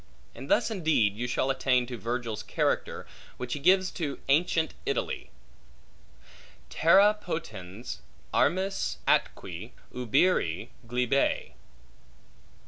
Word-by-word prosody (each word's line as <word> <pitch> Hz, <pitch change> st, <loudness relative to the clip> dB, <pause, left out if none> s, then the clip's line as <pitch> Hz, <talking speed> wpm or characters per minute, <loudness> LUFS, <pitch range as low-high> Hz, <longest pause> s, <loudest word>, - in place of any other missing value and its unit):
And -, -, -9 dB
thus -, -, +3 dB
indeed 155 Hz, -, +2 dB
you 120 Hz, +3 st, -3 dB
shall 130 Hz, +2 st, +1 dB
attain 130 Hz, -2 st, +2 dB
to 120 Hz, 0 st, -6 dB
Virgil's 115 Hz, -2 st, -3 dB
character -, -, -1 dB, 0.3 s
which 125 Hz, -1 st, -4 dB
he -, -, -3 dB
gives 185 Hz, +4 st, +4 dB
to 150 Hz, -5 st, -3 dB
ancient 160 Hz, +2 st, +2 dB
Italy: -, -, -2 dB, 1.4 s
Terra 195 Hz, +6 st, +6 dB
potens 110 Hz, -, -6 dB, 0.3 s
armis 195 Hz, +2 st, +1 dB
atque 95 Hz, +7 st, 0 dB, 0.2 s
ubere 125 Hz, -, +1 dB, 0.2 s
glebae. 125 Hz, +3 st, +1 dB
130 Hz, 100 wpm, -28 LUFS, 115-170 Hz, 1.4 s, Terra